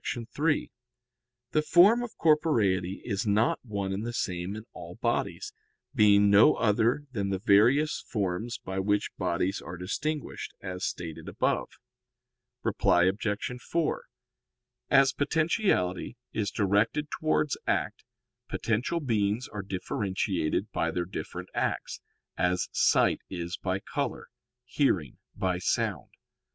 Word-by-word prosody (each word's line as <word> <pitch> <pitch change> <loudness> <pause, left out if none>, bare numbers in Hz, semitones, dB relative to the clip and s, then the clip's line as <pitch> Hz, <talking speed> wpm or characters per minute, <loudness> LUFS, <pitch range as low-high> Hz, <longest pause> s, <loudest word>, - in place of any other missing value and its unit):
3: 150 +1 0 0.8
The 155 - +3
form 190 +9 +6
of 245 -2 -7
corporeity 110 - +2
is 105 -1 -2
not 105 +3 +2
one 100 -5 -3
and 100 +3 -3
the 120 +1 -4
same 90 -2 -2
in 110 - -7
all - - -9
bodies, - - -2 0.4
being 105 -4 +5
no 100 +2 +7
other 115 +6 +2
than 100 -5 -2
the 95 - 0
various 120 +10 +3
forms 105 +1 -2
by 95 0 -5
which 105 +2 0
bodies 90 +1 0
are 90 - -8
distinguished, 145 - -4
as 90 0 -6
stated 85 -4 -4
above. - - 0 0.9
Reply 85 - +3
Obj. 105 +6 -1
4: 165 +3 -1 0.8
As 135 0 +5
potentiality 145 - 0 0.2
is 105 -2 -1
directed 110 +9 +1
towards 155 -2 0
act, - - -1 0.5
potential 125 +10 -1
beings 110 -2 0
are 105 - -5
differentiated 95 -2 -2
by 85 - 0
their 85 +1 -2
different 95 - -6
acts, - - -2 0.4
as 90 0 +1
sight - - +3
is 85 -1 -4
by 95 0 -2
color, - - -4 0.4
hearing 100 - 0 0.2
by 95 -3 -1
sound. - - -1
105 Hz, 120 wpm, -28 LUFS, 95-130 Hz, 0.9 s, no